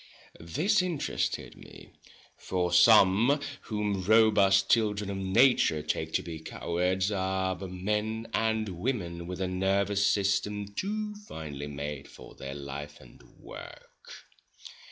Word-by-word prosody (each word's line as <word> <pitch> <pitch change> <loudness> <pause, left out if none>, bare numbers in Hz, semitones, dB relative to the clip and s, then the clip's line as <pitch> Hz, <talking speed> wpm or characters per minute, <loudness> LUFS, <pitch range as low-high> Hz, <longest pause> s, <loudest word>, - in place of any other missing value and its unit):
This 170 - +1
interested 175 -5 -2
me, - - -14 0.4
for 90 -2 -2
some 110 +7 +6 0.3
whom 105 -3 -2
robust 100 -2 +4
children 105 -3 +1
of 100 - -4
nature 95 - +3
take 80 +1 -2
to - - +1
be 80 -2 -7
cowards 90 +4 -1
are 95 -1 -1
but 95 0 -7
men 105 +4 -2
and 110 -1 0
women 85 -3 -3
with 90 0 -6
a 95 - -1
nervous 100 +2 +1
system 105 +1 +1
too 210 - -3
finely 75 -3 -7
made 70 0 -6
for - - -13
their 70 0 -8
life 70 +1 -7
and - - -17 0.2
work. - - -11
95 Hz, 125 wpm, -29 LUFS, 85-110 Hz, 0.4 s, some